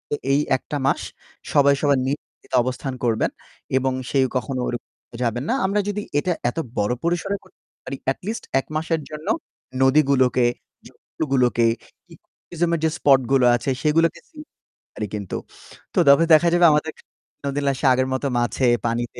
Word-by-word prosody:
এ -, -, 0 dB, 0.2 s
এই 140 Hz, -, +4 dB, 0.2 s
১ -, -, -13 dB
টা 145 Hz, -, 0 dB
মাস -, -, +2 dB, 0.5 s
সবাই, 140 Hz, 0 st, +5 dB
সবার, 140 Hz, -2 st, +3 dB
নিজ 140 Hz, +2 st, 0 dB, 0.3 s
ইতে 130 Hz, -, -1 dB
অবস্থান 130 Hz, +1 st, -4 dB
করবেন 115 Hz, -2 st, +1 dB, 0.5 s
এবং 130 Hz, 0 st, 0 dB, 0.2 s
সেই 135 Hz, -2 st, +3 dB
কখনো 130 Hz, 0 st, -2 dB
ওইরকম 120 Hz, -, -5 dB, 0.3 s
যাবেন 120 Hz, +3 st, -1 dB
না। -, -, +2 dB
আমরা 205 Hz, +2 st, +1 dB
যদি 205 Hz, 0 st, -2 dB, 0.2 s
এটা 180 Hz, +5 st, 0 dB, 0.2 s
এত 145 Hz, -, -9 dB, 0.2 s
বড় 105 Hz, +4 st, +1 dB
পরিসরে 175 Hz, +4 st, 0 dB
করতে -, -, -25 dB, 0.2 s
পারি 135 Hz, -, -5 dB
এটি -, -, -5 dB
লিস্ট 230 Hz, -, -4 dB, 0.2 s
১ -, -, -14 dB
মাসের 160 Hz, +1 st, -1 dB
জন্য 155 Hz, +1 st, -8 dB, 0.6 s
নদীগুলোকে, 130 Hz, -3 st, +4 dB, 0.4 s
জমিগুলোকে, 125 Hz, -5 st, 0 dB, 0.5 s
eco -, -, -17 dB, 0.2 s
tourism 170 Hz, 0 st, -2 dB
এর 160 Hz, -, -2 dB
যে 160 Hz, -, +3 dB
স্পট 135 Hz, -2 st, +5 dB, 0.4 s
আছে 135 Hz, -, -3 dB
সেগুলোকে 165 Hz, +2 st, +2 dB
সিং 305 Hz, -, -12 dB, 0.5 s
পারি 105 Hz, -, -4 dB
কিন্তু। 100 Hz, -3 st, -4 dB, 0.6 s
তো -, -, +2 dB
তবে 140 Hz, +4 st, +7 dB
দেখা 165 Hz, +2 st, +6 dB
যাবে 175 Hz, 0 st, +5 dB
আমাদের 150 Hz, +1 st, +1 dB
ক্ষেত্রে -, -, -28 dB
নদীনালা 140 Hz, 0 st, 0 dB
সে -, -, -3 dB
আগের 130 Hz, +1 st, +1 dB
মতো 135 Hz, +2 st, -1 dB
মাছে 120 Hz, +2 st, 0 dB, 0.2 s
পানিতে 120 Hz, 0 st, -2 dB
140 Hz, 170 wpm, -22 LUFS, 130-160 Hz, 0.6 s, তবে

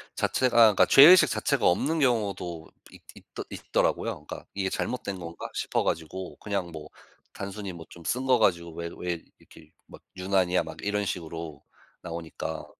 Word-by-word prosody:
자체가 130 Hz, -, +1 dB
그러니까 110 Hz, -3 st, +7 dB
죄의식 165 Hz, +6 st, +8 dB
자체가 -, -, 0 dB
없는 145 Hz, -, +1 dB
경우도 100 Hz, -, -1 dB, 0.2 s
있 -, -, -15 dB
있드 -, -, -9 dB
있더라고요. 75 Hz, -, -1 dB
그러니까 -, -, -8 dB
이게 95 Hz, -1 st, -1 dB
잘못된 100 Hz, -5 st, -3 dB
건가 85 Hz, -1 st, -7 dB
싶어 -, -, -1 dB
가지고 90 Hz, +3 st, -4 dB
그냥 100 Hz, -4 st, -3 dB
뭐"단순히 100 Hz, +5 st, -9 dB
뭐 85 Hz, -2 st, -10 dB
좀 85 Hz, -, -13 dB
쓴 125 Hz, +10 st, -1 dB
거 130 Hz, -2 st, +4 dB
가지고 85 Hz, -5 st, +1 dB
왜 85 Hz, +1 st, -5 dB
왜 85 Hz, -2 st, -4 dB, 0.2 s
이렇게 -, -, -18 dB
막 -, -, -14 dB, 0.2 s
유난이야?" 90 Hz, -1 st, +1 dB
막 80 Hz, 0 st, -9 dB
이런 105 Hz, 0 st, -1 dB
식으로 80 Hz, -4 st, -6 dB, 0.4 s
나오니까 80 Hz, -1 st, -6 dB
90 Hz, 350 characters per minute, -27 LUFS, 85-105 Hz, 0.4 s, 죄의식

